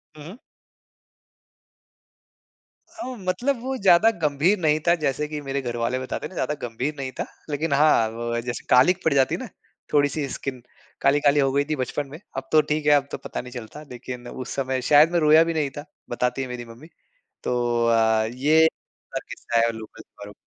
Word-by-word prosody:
हुँ, 150 - -11
हुँ। 200 +7 -10 2.5
हाँ, 325 -7 -7
मतलब 235 +8 -1
वो 265 +2 -3
ज़्यादा 195 +2 +5
गंभीर 155 +7 +2
नहीं 155 -2 +2
था 170 - +6
जैसे 150 -1 -1
कि 150 0 -5
मेरे 135 0 -3
घर 120 -2 -4
वाले 120 +2 -1
बताते 130 - -5
हैं - - -5
ना 185 - -14
ज़्यादा 150 -2 -1
गंभीर 125 +6 -3
नहीं 135 -1 -4
था। - - -1 0.2
लेक़िन 150 +1 -1
हाँ, 140 -6 +4
वो 120 +1 -3
जैसे 120 0 -5
कालिक 175 +9 +4
पड़ 160 - +3
जाती 135 -1 +3
है - - -6
ना - - -6 0.5
थोड़ी-सी 145 0 +2
स्किन 130 -2 -5 0.4
काली-काली 145 +1 +3
हो 135 -1 +2
गई 140 +1 +2
थी 155 - -2
बचपन 135 +2 -3
में 150 +4 -10 0.2
अब 135 - -5
तो 155 - +6
ठीक 150 0 -2
है 150 - +5
अब 140 -1 +4
तो - - -3
पता - - -6
नहीं 125 0 -11
चलता। 120 +4 -9
लेकिन 125 0 -8
उस 130 +1 -7
समय 130 -1 -1
शायद 150 +3 +6
मैं 175 - +2
रोया 155 +1 +6
भी 165 - -2
नहीं 150 -3 0
था 145 - -6 0.2
बताती 125 +2 -1
है 130 - -3
मेरी 125 -1 -6
मम्मी। 115 +7 -13 0.6
तो 120 -1 0
अ, 110 -1 +3
ये 155 +5 +4 0.5
बहुत - - -3
किस्सा 115 - -2
है 115 0 +2
लोकल 110 -1 -10 0.2
वालो 100 0 -9
140 Hz, 200 wpm, -24 LUFS, 125-155 Hz, 2.5 s, था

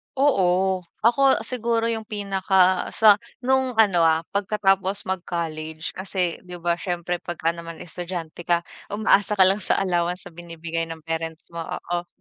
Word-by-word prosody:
Oo, 190 -8 +2 0.2
ako 265 0 +4
siguro 230 -1 0
yung 220 -1 -4
pinaka 190 -3 +2
sa 210 -2 +6 0.2
nung 260 -1 +1
ano, 205 -6 +4
ah, 160 +1 +2
pagkatapos 195 -1 +1
mag-college. 165 -3 -4
Kasi 185 -2 -2
‘di 180 -1 -10
ba, 170 0 -1
siyempre 175 -1 -3
pagka 165 -1 -2
naman 170 -1 -9
estudyante 175 -1 -7
ka, 170 -1 +2 0.2
umaasa 210 0 +2
ka 190 - +6
lang 195 +3 +4
sa - - +1
allowance 175 0 -1
sa 180 - -10
binibigay 165 -1 -5
ng 160 -1 -8
parents 165 0 -4
mo, 170 - -6
oo. 175 0 -4
180 Hz, 145 wpm, -24 LUFS, 170-205 Hz, 0.2 s, sa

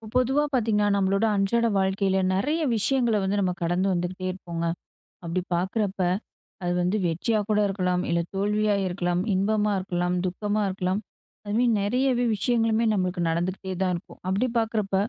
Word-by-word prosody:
பொதுவா 265 +4 +3
பார்த்தீங்கன்னா, 215 -4 +2
நம்மளோட 195 +2 +2
அன்றாட 230 +4 +2
வாழ்க்கையில 190 0 +1 0.2
நெறைய 295 - 0 0.2
விஷயங்கள 235 -1 +2
வந்து 195 +2 0
நம்ம 185 -2 +1
கடந்து 175 +3 +1
வந்துகிட்டே 180 +1 -3
இருப்போங்க. 170 -2 -5 0.6
அப்டி 170 +2 -1
பார்க்றப்ப, 195 +3 -1 0.6
அது 175 0 0
வந்து 180 +4 +1
வெற்றியா 175 +7 0
கூட 210 -1 +3
இருக்கலாம், 180 -2 0
இல்ல 170 0 +2 0.2
தோல்வியா 210 +1 +1
இருக்கலாம், 175 -1 -1
இன்பமா 210 +2 +1
இருக்கலாம், 180 -1 -1
துக்கமா 205 +3 -1
இருக்கலாம். 185 +1 -1 0.5
அது 205 - -3
மாதிரி 245 +1 +3
நெறையவே 245 +4 +1
விஷயங்களுமே 225 +1 +1
நம்மளுக்கு 185 -2 -1
நடந்துகிட்டே 185 +3 -2
தான் 185 -1 +2
இருக்கும். 170 - -10
அப்டி 200 +7 +1
பார்க்றப்ப 220 -3 0
195 Hz, 145 wpm, -25 LUFS, 180-215 Hz, 0.6 s, பொதுவா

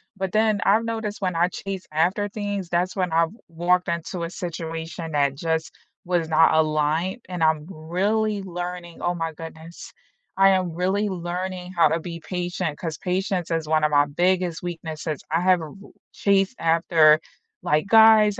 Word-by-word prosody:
But 190 -1 -3
then 215 -1 +2
I've 220 +3 +4
noticed 220 -3 -4
when 180 -2 -1
I 175 +2 +2
chase 195 0 -6
after 185 +6 +1
things, 205 -3 -4
that's 180 +2 0
when 185 -3 -1
I've 165 +1 +2 0.2
walked 175 +2 +1
into 170 +1 -3
a 165 - -3
situation 165 -1 -5
that 140 -1 +2
just 160 +1 -2 0.3
was 175 -2 0
not 160 +1 +5
aligned, 155 +7 +1
and 180 -2 -2
I'm 160 -1 +2
really 200 +6 -1
learning 175 -1 -6
Oh 175 0 0
my 165 -1 -3
goodness, 160 +1 -10 0.5
I 195 0 +6
am 185 -2 +1
really 195 +4 0
learning 180 +1 -4
how 170 - +5
to 165 - 0
be 170 0 -7
patient, 175 -3 -3
'cause 165 -3 -5
patience 180 -1 -2
is 165 -2 -1
one 155 0 +2
of 150 - +2
my 145 0 +5
biggest 175 +3 0
weaknesses, 160 -3 -5
I 165 +2 +2
have 185 -1 +3
a - - -5
r 150 - -10 0.4
chased 195 +3 +2
after, 160 -2 +4 0.4
like, 155 +4 +1
guys 220 -1 +6
175 Hz, 170 wpm, -24 LUFS, 160-190 Hz, 0.5 s, I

